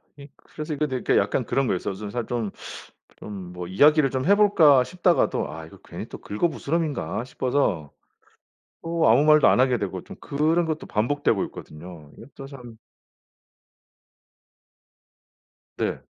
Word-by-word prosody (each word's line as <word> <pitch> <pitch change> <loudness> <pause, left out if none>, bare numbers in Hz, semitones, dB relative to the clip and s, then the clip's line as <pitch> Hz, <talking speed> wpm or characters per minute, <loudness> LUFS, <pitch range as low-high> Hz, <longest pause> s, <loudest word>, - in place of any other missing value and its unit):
그니 140 0 -13
그래서 155 0 -7
이거도 145 -2 -2
이렇게 - - +1
약간 - - 0
그런 135 -1 0
거여서 95 0 -2
좀 100 +2 -7
살 120 +1 -3
좀 115 -4 -3 0.7
좀 95 -4 -8
뭐 90 0 -7
'이야기를 145 - +4
좀 130 -1 -2
해 200 - +6
볼까?' 155 -11 +5
싶다가도 180 - +1
'아 80 +1 -8
이거 80 - -15
괜히 - - -8
또 - - -9
긁어 105 +12 -1
부스럼인가?' 155 -6 -3
싶어서 125 - -1 0.9
또 165 -3 +1
아무 125 +6 +5
말도 150 -1 +6
안 - - +4
하게 130 -2 +3
되고 95 -3 -4
좀 - - -11
그런 160 +4 0
것도 160 -1 -4
반복되고 115 -1 0
있거든요. 75 -1 -12
이것도 135 -1 -11
참 125 -5 -12 3.0
네. - - -2
130 Hz, 295 characters per minute, -24 LUFS, 100-150 Hz, 3.0 s, 해